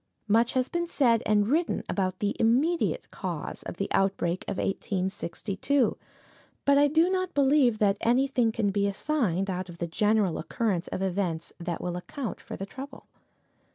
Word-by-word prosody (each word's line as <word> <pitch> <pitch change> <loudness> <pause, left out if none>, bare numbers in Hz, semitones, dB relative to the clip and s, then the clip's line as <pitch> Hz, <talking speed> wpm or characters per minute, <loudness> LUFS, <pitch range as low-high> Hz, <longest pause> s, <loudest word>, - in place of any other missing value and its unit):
Much 230 +3 +3
has 255 -1 +1
been 345 0 -2
said 235 -8 +3
and 210 -1 +3
written 325 +4 +1
about 185 -2 -1
the 205 +1 -1
immediate 275 +10 +1
cause - - -5
of - - -7
the - - -1
outbreak 185 -2 +1
of 200 - -3
1862, 195 +6 -1 0.7
but 280 - +5
I 290 +1 +5
do 320 +4 +3
not 370 -2 -1
believe 270 -4 +4
that 205 -1 +2
anything 245 -1 +2
can 215 -3 0
be 200 0 +1
assigned 200 - 0
out 185 -1 -3
of 170 - -10
the 170 - -2
general 205 +1 +1
course 190 0 -1
of 190 - -3
events 180 -4 -2
that 170 -1 -4
will 175 -1 -3
account 230 +7 -5
for - - -7
the 195 - -4
trouble. 270 +7 -9
215 Hz, 165 wpm, -28 LUFS, 190-270 Hz, 0.7 s, but